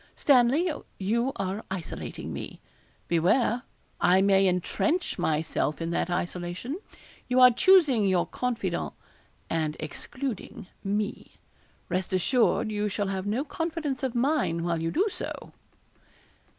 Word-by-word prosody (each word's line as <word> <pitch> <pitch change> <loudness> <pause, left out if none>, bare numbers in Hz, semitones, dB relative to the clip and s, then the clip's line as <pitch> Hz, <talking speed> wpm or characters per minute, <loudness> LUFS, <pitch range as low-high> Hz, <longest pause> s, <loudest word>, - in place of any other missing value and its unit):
Stanley, 275 +5 +4 0.3
you 235 +7 0
are 195 +2 -3
isolating 185 -4 -5
me. - - -7 0.5
Beware 210 +8 +2 0.4
I 180 +1 +5
may 195 -1 +4
entrench 245 - 0
myself 155 -1 0
in 165 0 -3
that 170 - 0
isolation. 180 - -3 0.5
You 250 0 +2
are 250 0 +9
choosing 285 - +5
your 185 -2 +2
confidant, 230 -8 -2 0.5
and 155 -2 -1
excluding 230 - -5 0.2
me; 205 +1 -2 0.5
rest 185 +2 -2
assured 230 +3 +2
you 210 0 -1
shall 200 0 -2
have 190 0 -3
no 230 +7 0
confidence 315 -3 -3
of 260 -3 -2
mine 240 - +1
while 170 -1 -1
you 165 - 0
do 380 - +2
so.' - - -6
205 Hz, 125 wpm, -27 LUFS, 180-255 Hz, 0.5 s, are